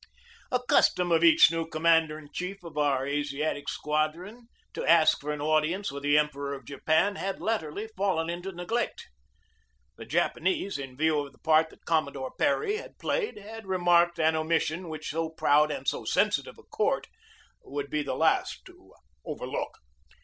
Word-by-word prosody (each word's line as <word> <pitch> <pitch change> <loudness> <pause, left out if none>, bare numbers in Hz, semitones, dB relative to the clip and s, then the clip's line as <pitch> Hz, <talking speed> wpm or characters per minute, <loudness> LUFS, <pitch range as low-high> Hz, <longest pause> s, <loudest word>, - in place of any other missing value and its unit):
A 250 - +2
custom 180 -1 +3
of 165 0 +3
each 165 -1 +7
new 165 -1 -2
commander 160 -1 +2
in 150 -2 -13
chief 180 +1 -5
of 165 -3 -10
our 140 -3 +1
Asiatic 145 0 -2
Squadron 165 +10 -2 0.3
to - - -4
ask 165 -1 +5
for 150 +1 -3
an 150 -1 -4
audience 155 +5 +1
with 140 0 -7
the 145 +1 +3
Emperor 140 -2 -1
of 135 -3 -12
Japan 160 - +1
had 190 +3 -3
latterly 205 -3 -2
fallen 185 -4 0
into 175 +3 -4
neglect. 195 +7 -3 0.9
The - - -9
Japanese, 190 0 0
in 135 -2 -8
view 155 0 +2
of 140 -1 -6
the - - -22
part 160 0 +3
that - - -20
Commodore 140 -5 -1
Perry 410 +9 0
had - - -10
played, 445 - -2
had 220 +1 -10
remarked 175 -2 +3
an 160 0 +3
omission 160 +2 -1
which 155 -1 -5
so 165 +1 -2
proud 150 -1 +3
and 135 -3 -5
so - - 0
sensitive - - 0
a - - -16
court - - -1 0.6
would 140 +1 -5
be 150 - 0
the 145 - -3
last - - +1
to - - -18 0.3
overlook. - - -5
160 Hz, 170 wpm, -28 LUFS, 150-180 Hz, 0.9 s, each